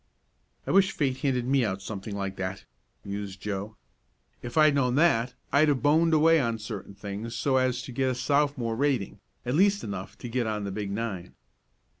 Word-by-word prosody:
"I - - -2
wish 195 0 +4
fate 135 -4 0
handed 130 -3 0
me 135 0 +2
out 100 -3 -1
something 100 +1 -6
like 100 -1 -3
that," 95 0 -4 0.4
mused 100 -1 -5
Joe. 105 +1 -5 0.6
"If 120 +5 -6
I 155 - +7
had 150 - +5
known 130 -3 +1
that 125 -6 +3 0.2
I'd 150 +2 +5
have 140 -3 +1
boned 160 +3 +4
away 165 +1 +5
on 115 -3 -1
certain 105 -2 -7
things 105 +3 -6
so 130 +3 +1
as 125 -1 +1
to - - -8
get 130 +1 0
a 130 - -1
Sophomore 140 -3 +1
rating 135 -5 0 0.3
at 125 - -1
least 200 +5 +3
enough 95 -1 -6
to - - -7
get 120 0 -1
on 105 -1 -2
the 100 - -3
big 100 0 -4
nine." 100 -4 -4
120 Hz, 195 wpm, -27 LUFS, 100-140 Hz, 0.6 s, I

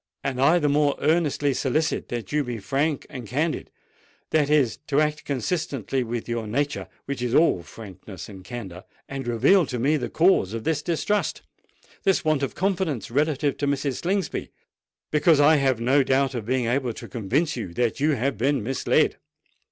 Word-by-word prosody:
And 130 -1 -2
I 155 +6 +5
the 150 -4 +1
more 145 0 +2
earnestly 150 -3 +1
solicit 150 +5 -1
you 120 -1 -1
to 150 +4 -1
be 125 -3 -4
frank 140 +7 -1
and 125 -4 -8
candid—that 150 +1 -3
is, 145 -6 +2
to 145 - +2
act 150 0 0
consistently 135 - -2
with 120 0 -4
your 115 -2 -3
nature, 145 +6 -1 0.2
which 140 -2 -4
is 125 0 0
all 155 - +4
frankness 95 +1 -10
and 95 -3 -11
candour,—and 120 +5 -8
reveal 140 - +4
to 125 - -3
me 140 +6 +2
the 140 - -4
cause 160 - +3
of 115 -1 -4
this 160 -2 0
distrust—this 190 +1 -2
want 155 -3 +2
of 135 - -2
confidence 180 - -1
relative 145 +1 +1
to 145 - -1
Mrs. 140 -2 -1
Slingsby,—because 170 -3 -1
I 150 +2 +6
have 135 -4 +1
no 130 +5 +3
doubt 135 +1 +1
of 115 -4 -5
being 130 -1 +1
able 125 0 0
to - - -9
convince 135 - -1
you 110 -8 -5
that 120 -3 0
you 150 +2 +3
have 130 -3 -1
been 135 -1 +1
misled." 130 +4 +1
140 Hz, 165 wpm, -24 LUFS, 120-150 Hz, 0.2 s, I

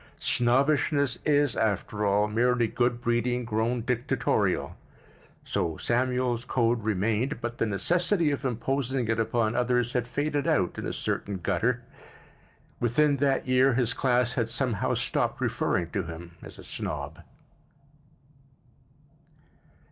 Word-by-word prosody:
Snobbishness 140 +2 +2
is, 145 -4 +3
after 105 0 -1
all, 100 +1 +3
merely 120 +2 +2
good 120 +1 0
breeding 120 +1 0
grown 115 +2 -1
dictatorial; 120 -5 0 0.7
so 80 -2 -2
Samuel's 125 0 0
code 120 -2 +1
remained 110 +6 0
but 120 0 -5
the 115 - +1
necessity 170 - +1
of 140 - -3
imposing 130 0 -1
it 115 0 +1
upon 115 0 0
others 125 0 +1
had 125 -2 0
faded 145 +2 -1
out 90 -3 +1
in - - -4
a - - -2
certain 100 -2 -3
gutter. 110 +7 0 1.0
Within 140 +5 +2
that 135 -1 +1
year 130 0 +4
his 125 -1 +1
class 125 -2 +1
had 115 -3 -1
somehow 125 -6 0
stopped - - -1
referring 85 -1 -1
to 100 - -1
him 85 0 -8
as - - -11
a - - -11
snob. 75 +1 -5
120 Hz, 125 wpm, -27 LUFS, 110-130 Hz, 1.0 s, year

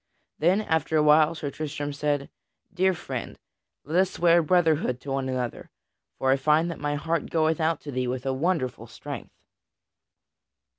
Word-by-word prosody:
Then, 180 +7 +3
after 160 -5 0
a 150 - +4
while, 155 +2 +5
Sir 145 -3 -4
Tristram 145 -1 -4
said: 145 -1 -1 0.4
"Dear 190 0 +2
friend, - - -6 0.5
let 160 +5 0
us 190 0 +3
swear 170 -1 +4
brotherhood 160 -6 +2
to 140 - -6
one 135 -1 -1
another, 125 -2 -4 0.5
for 130 - +2
I 135 - +4
find 155 +5 +2
that 165 - -8
my 145 0 -1
heart 165 +3 -2
goeth 160 -1 +1
out 160 0 +1
to 145 - -7
thee 130 -1 -1
with 125 +1 -3
a 135 - 0
wonderful 140 -3 -1
strength." - - -8
150 Hz, 165 wpm, -26 LUFS, 140-165 Hz, 0.5 s, while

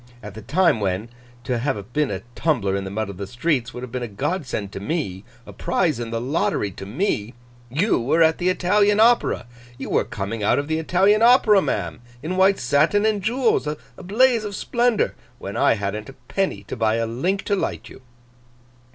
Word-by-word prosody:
At 105 -1 -8
the 110 - -9
time 150 - +2
when, 100 +2 -2 0.3
to 125 -2 -1
have 115 -3 -3
been 150 -2 +1
a 95 -1 -4
tumbler 115 -11 0
in 100 0 -3
the - - -4
mud 110 +2 -3
of 95 - -12
the 100 0 -5
streets, 125 - -1
would 125 - -8
have 125 - -7
been 125 - -3
a 120 - -3
godsend 110 - -3
to - - -6
me, 100 - -3 0.2
a - - -11
prize - - 0
in 120 -1 -4
the 115 0 -2
lottery 125 -5 -1
to 95 - -9
me, 120 - -2 0.3
you 165 - +1
were 145 +8 +3
at 160 0 +3
the 180 0 +1
Italian 205 +3 +2
Opera. 235 - +3 0.3
You 135 - -6
were - - +3
coming 105 +2 -5
out 105 - +2
of 145 0 -1
the 160 0 0
Italian 190 +6 +3
Opera, 230 -4 +6
ma'am, 85 - -3 0.2
in 175 +4 -3
white 190 +1 +4
satin 150 - +2
and 215 -2 +1
jewels, 235 - +1
a 150 0 -2 0.2
blaze 230 +4 +3
of 205 -2 -5
splendour, 240 +1 +1 0.2
when 100 -3 -7
I - - +3
hadn't 105 +2 -4
a - - -10
penny 190 - -1
to - - -6
buy 110 -2 +1
a 115 0 0
link 170 - -1
to 205 - 0
light - - -3
you. - - -13
140 Hz, 205 wpm, -22 LUFS, -, 0.3 s, Opera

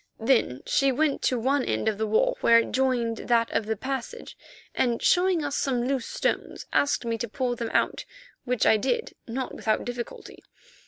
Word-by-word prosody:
Then 225 - +1
she 275 -1 +2
went 290 +2 0
to 255 - +1
one 265 +3 +1
end 110 - -1
of 215 -1 0
the 220 - 0
wall 215 +1 +2
where 230 - +6
it 230 - +1
joined 245 -3 0
that 230 -1 +1
of 215 - -1
the 220 - 0
passage, 270 - -5 0.4
and, 240 -2 +1
showing 355 -3 +2
us 285 0 -2
some 250 -3 0
loose 265 -3 -1
stones, - - -2
asked 285 -3 +1
me 230 -1 -2
to 235 - -2
pull 250 +1 -2
them 230 -1 -4
out, - - 0 0.4
which 250 -3 0
I 220 - +5
did, 445 - -1
not 255 +3 -4
without 215 -1 -1
difficulty. 245 -1 -7
245 Hz, 190 wpm, -26 LUFS, 230-270 Hz, 0.4 s, where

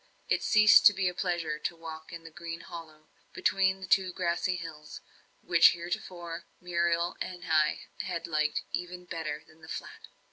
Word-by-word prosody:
It - - +2
ceased 215 -1 +7
to 205 - +6
be 190 -1 0
a 180 - 0
pleasure 170 -4 -2
to 170 - -3
walk 160 -1 -9
in 170 -1 -8
the 165 - -11
green 165 +1 -7
hollow, 160 -2 -10 0.3
between 190 0 +2
the - - -5
two 190 -1 +3
grassy 180 +1 0
hills, 160 -3 -8 0.4
which 165 -1 +6
heretofore 170 0 -5
Muriel 170 0 0
and 180 -1 -5
I 155 -1 +3 0.2
had 170 - -3
liked 155 -2 0
even 180 0 -4
better 165 -3 -4
than 160 +1 -21
the 160 - -13
Flat. - - -7
170 Hz, 170 wpm, -30 LUFS, 160-180 Hz, 0.4 s, ceased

